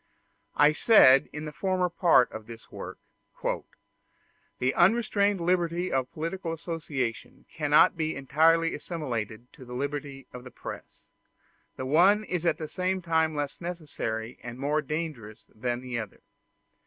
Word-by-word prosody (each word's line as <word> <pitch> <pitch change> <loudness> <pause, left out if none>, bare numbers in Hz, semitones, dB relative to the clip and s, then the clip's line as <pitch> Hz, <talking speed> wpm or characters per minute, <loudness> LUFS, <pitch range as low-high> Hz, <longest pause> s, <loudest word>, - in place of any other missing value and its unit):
I 150 +1 +6
said 145 - +6
in 150 +1 -6
the 150 - -5
former 185 +2 0
part 170 -7 +4
of 110 -1 -8
this 115 -1 -12
work, - - -8 1.6
"The 130 +1 +1
unrestrained 205 0 +3
liberty 175 0 0
of 130 -1 0
political 165 +2 -4
association 155 -8 -4
cannot 150 +4 +4
be 160 -1 -2
entirely 160 +5 +3
assimilated 125 -8 -5
to - - -13
the 125 0 -9
liberty 140 0 -4
of 125 0 -9
the 125 - -10
press. - - -10 0.7
The 130 - -5
one 185 +10 +4
is 175 -4 -2
at - - +2
the 155 - -5
same 185 +2 -2
time 160 -2 +1
less 145 +2 -4
necessary 145 -10 -5
and 120 0 -8
more 145 +3 0
dangerous 150 -8 -5
than 120 +2 -3
the 125 -2 -4
other. 110 -4 -8
150 Hz, 140 wpm, -28 LUFS, 130-170 Hz, 1.6 s, I